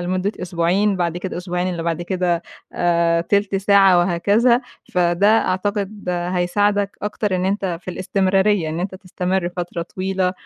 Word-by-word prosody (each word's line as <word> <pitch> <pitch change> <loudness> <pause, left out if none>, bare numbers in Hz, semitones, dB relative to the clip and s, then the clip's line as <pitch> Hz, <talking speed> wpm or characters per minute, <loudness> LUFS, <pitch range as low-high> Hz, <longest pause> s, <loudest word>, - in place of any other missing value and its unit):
لمدة 185 +3 -1
أسبوعين، 180 +4 +1
بعد 175 -1 -1
كده 180 +1 -5
الأسبوعين 180 0 -2
اللي 170 -2 -3
بعد 170 0 -2
كده 175 -1 -1 0.3
آآ، 170 -1 +2
تِلت 200 +3 0
ساعة 195 -2 +5
وهكذا. 205 +8 +3 0.3
فده 175 +2 +2 0.2
أعتقد 200 +1 -2
هيساعدك 185 +3 0
أكتر 210 -2 -1
إن 180 - -1
أنتَ 190 -3 -1
في - - -6
الاستمرارية، 190 0 +1
إن 160 +2 -3
أنتَ 190 +1 -3
تستمر 185 -1 -2
فترة 175 -1 -4
طويلة. 185 +1 -2
185 Hz, 145 wpm, -20 LUFS, 175-200 Hz, 0.3 s, ساعة